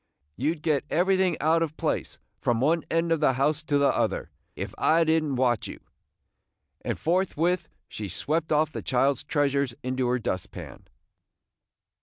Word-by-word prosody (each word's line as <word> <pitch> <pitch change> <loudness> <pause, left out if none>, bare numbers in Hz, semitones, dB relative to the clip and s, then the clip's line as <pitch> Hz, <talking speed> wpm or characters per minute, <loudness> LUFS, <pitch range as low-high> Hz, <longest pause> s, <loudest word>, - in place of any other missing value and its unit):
You 150 +7 0
'd 155 - -19
get 150 -4 +1
everything 185 0 +2
out 160 +2 +3
of 160 -2 -2
place, - - -2 0.2
from 120 -2 +1
one 155 +5 +2
end 165 0 +1
of 165 - +3
the 145 -3 +3
house 145 +4 +1
to 150 -2 0
the 140 -1 +3
other, - - -1 0.2
if - - -5
I 165 +1 +4
did 160 0 +2
n't 145 -3 -2
watch 125 -3 +1
you!" - - -8 1.0
And - - -2
forthwith 180 0 0 0.2
she 105 -2 -6
swept 155 - -1
off 155 0 +2
the - - -5
child's 135 +1 +1
treasures 140 -4 0
into 130 0 -1
her 125 +1 +2
dust 110 -6 -3
pan. - - -10
150 Hz, 170 wpm, -26 LUFS, 130-165 Hz, 1.0 s, I